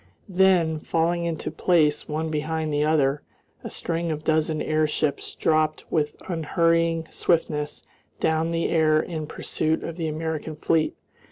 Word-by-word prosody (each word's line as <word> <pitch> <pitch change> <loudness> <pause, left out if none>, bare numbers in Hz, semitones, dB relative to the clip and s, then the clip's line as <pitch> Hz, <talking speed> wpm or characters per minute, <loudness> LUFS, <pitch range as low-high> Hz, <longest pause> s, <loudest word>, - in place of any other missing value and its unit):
Then, 180 -4 +3
falling 170 +2 0
into 165 -2 -3
place 155 -2 +2
one 155 +1 -2
behind 155 0 -2
the 145 0 +2
other, 150 -2 +2 0.4
a - - -5
string 170 0 -2
of 155 -1 -2
a - - -26
dozen 155 0 +1
airships 155 -1 0
dropped 155 -1 +1
with 150 -2 0
unhurrying 165 -1 +1
swiftness 150 -3 0 0.4
down 160 +1 +1
the 165 0 0
air 155 -2 +3
in 155 -1 -4
pursuit 160 +1 -1
of 165 - -5
the 165 -2 -2
American 155 0 -3
fleet. 155 +1 +1
160 Hz, 145 wpm, -25 LUFS, 155-165 Hz, 0.4 s, Then